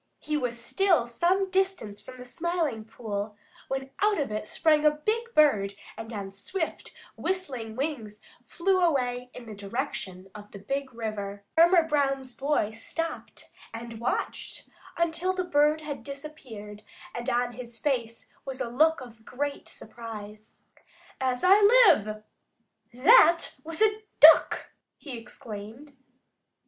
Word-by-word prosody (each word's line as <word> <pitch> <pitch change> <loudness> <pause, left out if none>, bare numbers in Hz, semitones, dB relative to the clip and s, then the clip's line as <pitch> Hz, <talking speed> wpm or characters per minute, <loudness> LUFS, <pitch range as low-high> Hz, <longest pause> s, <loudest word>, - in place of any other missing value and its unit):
He 305 - -3
was 245 -5 -2
still 350 +1 +2
some 360 +11 +1
distance 375 - -1
from 255 - -11
the 250 - -10
Smiling 315 -5 -2
Pool 210 -2 -5 0.3
when 270 0 -4
out 415 -3 +3
of 280 -7 -2
it 215 0 -4
sprang 305 +2 +2
a 305 - +7
big 430 +11 -2
bird 205 -10 +4 0.2
and 225 +1 -8
on 200 -3 -5
swift, 320 - -4 0.2
whistling 260 -13 -3
wings 245 -7 -4 0.2
flew 370 +9 +1
away 250 -7 +1
in 250 - -9
the 220 - -8
direction 200 -3 -5
of 210 0 -11
the - - -10
Big 270 +7 -4
River. 205 -3 -5
Farmer 340 +1 +6
Brown's 275 -4 0
boy 275 -4 0
stopped 330 +9 -6 0.2
and 230 -1 -8
watched 235 - -3 0.3
until 340 +2 0
the 365 - -1
bird 300 -2 +2
had 290 -5 -6
disappeared, 255 -7 -9 0.3
and 240 +2 -4
on 245 0 +1
his 240 -1 -10
face 230 -2 -3
was 265 -1 -6
a - - -2
look 310 +5 +3
of 230 -3 -12
great 280 +4 -4
surprise. 215 -2 -10 0.6
"As 255 -1 -1
I 390 +3 +6
live, 380 - +5 0.7
that 335 - +6
was 330 +6 -1
a 430 0 +2 0.2
Duck!" 315 +2 +7 0.3
he 275 -5 -8
exclaimed. 230 +4 -9
260 Hz, 135 wpm, -27 LUFS, 225-320 Hz, 0.7 s, a